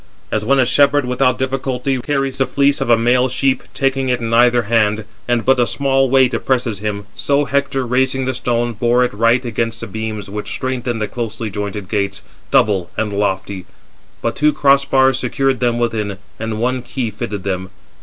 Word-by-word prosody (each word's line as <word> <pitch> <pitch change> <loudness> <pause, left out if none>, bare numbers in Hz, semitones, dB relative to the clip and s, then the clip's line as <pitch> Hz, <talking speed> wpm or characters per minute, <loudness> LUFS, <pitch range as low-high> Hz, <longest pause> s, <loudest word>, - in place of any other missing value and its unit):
As 110 - 0
when 135 +5 +2
a 130 - +4
shepherd 145 +1 +3
without 125 0 +1
difficulty 130 0 -2
carries 135 -1 -1
the 135 - +2
fleece 140 +2 +2
of - - -1
a 115 - +6
male 125 +3 +2
sheep, 130 +1 +1
taking 135 -1 0
it 125 - +1
in 115 -1 -3
either 120 0 +4
hand, 110 -1 +1 0.2
and 120 -1 0
but 130 0 +4
a 120 - +3
small 135 -1 +1
weight 130 -1 +4
oppresses 120 -3 -1
him; 100 -1 -4
so 145 0 +1
Hector, 140 -2 -1
raising 130 +2 +1
the 130 - -1
stone, 120 -1 -1
bore 120 +3 +2
it 125 - -4
right 115 +4 +2
against 115 0 -2
the - - -5
beams 110 0 -5
which 105 +1 -6
strengthened 125 -3 -2
the - - -1
closely 115 -2 -5
jointed 100 0 -5
gates, 100 0 -2 0.3
double 95 -5 +2
and 105 -2 -1
lofty; 100 -2 -2 0.6
but - - -1
two 150 0 +3
cross 140 0 +3
bars 135 -1 +3
secured 135 +1 0
them 120 -1 +1
within, 110 -4 -2 0.2
and 110 -1 -3
one 125 +2 0
key 120 -2 -4
fitted 105 -2 -5
them. 95 -1 -3
120 Hz, 190 wpm, -18 LUFS, 110-130 Hz, 0.6 s, a